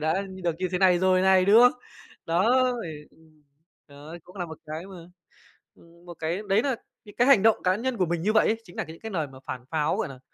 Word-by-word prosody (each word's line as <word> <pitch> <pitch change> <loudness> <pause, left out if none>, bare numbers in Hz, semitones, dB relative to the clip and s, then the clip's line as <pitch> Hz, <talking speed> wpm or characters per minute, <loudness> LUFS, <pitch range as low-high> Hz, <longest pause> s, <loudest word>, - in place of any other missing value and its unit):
đã 160 +5 0
như 190 -1 -10
được 170 -2 -1
như 185 0 -2
thế 180 - 0
này 185 -2 +4
rồi 185 0 +3
này", 190 -1 +4
đúng 205 +3 +6
không? 245 0 +6 0.5
Đó, 225 +10 +3 0.2
thì 150 -2 -8
ừm, 155 -2 -25 0.5
đó 145 +4 -11
cũng 180 - -17
là 175 -2 -4
một 160 -1 -10
cái 155 +4 -6
mà, 195 -1 -11 0.8
ừm, 170 +1 -21
một 175 - -9
cái 165 +5 -2
đấy 200 +3 +3
nà 265 0 -1 0.3
những 205 - -14
cái 245 - +2
hành 270 -8 +6
động 225 -1 +5
cá 185 0 +2
nhân 240 +3 -3
của 185 - +1
mình 170 0 -2
như 210 +4 0
vậy 220 - +4
ấy 225 - +1
chính 175 - -16
nà - - -2
những 160 +1 -11
cái 225 - -7
lời 160 -6 -2
mà 130 -1 -14
phản 125 -1 -7
pháo, 150 -2 0
gọi - - -2
nà, 130 -2 -11
180 Hz, 260 wpm, -26 LUFS, 160-200 Hz, 0.8 s, đúng